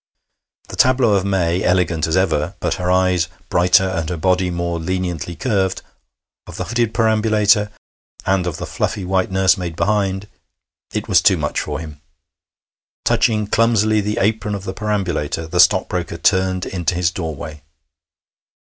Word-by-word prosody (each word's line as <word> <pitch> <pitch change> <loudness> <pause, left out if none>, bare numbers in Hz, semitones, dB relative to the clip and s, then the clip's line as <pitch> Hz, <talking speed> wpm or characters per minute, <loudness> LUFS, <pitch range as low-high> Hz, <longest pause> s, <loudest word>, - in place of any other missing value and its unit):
The - - -7
tableau 130 -4 +3
of 100 -1 +1
May, 90 -2 0
elegant 90 -3 +1
as 80 +3 +1
ever, 85 -1 0
but - - -1
her 90 - -1
eyes 90 -2 +2 0.2
brighter 90 +1 +4
and 85 -4 -3
her 90 - -3
body 90 +2 +1
more 85 -1 -2
leniently 90 -1 -3
curved, 95 -4 -1 0.6
of - - -9
the - - -2
hooded 120 0 -1
perambulator, 110 -2 +2 0.6
and 95 -2 +1
of 85 - -3
the - - -5
fluffy 100 - -3
white 95 0 0
nursemaid 95 -3 +1
behind 100 0 0 0.6
it - - -3
was - - +4
too - - +4
much - - -2
for - - -4
him. 75 -3 -10 1.0
Touching 105 -2 +2
clumsily 110 -1 +2
the 105 +1 -3
apron 105 0 0
of 100 - -6
the 95 - -5
perambulator, 95 -8 -2
the 90 +2 -3
stockbroker 90 -1 +2
turned 95 +1 +1
into 90 -2 -2
his 90 0 +1
doorway. 80 -5 -6
95 Hz, 150 wpm, -19 LUFS, 85-105 Hz, 1.0 s, brighter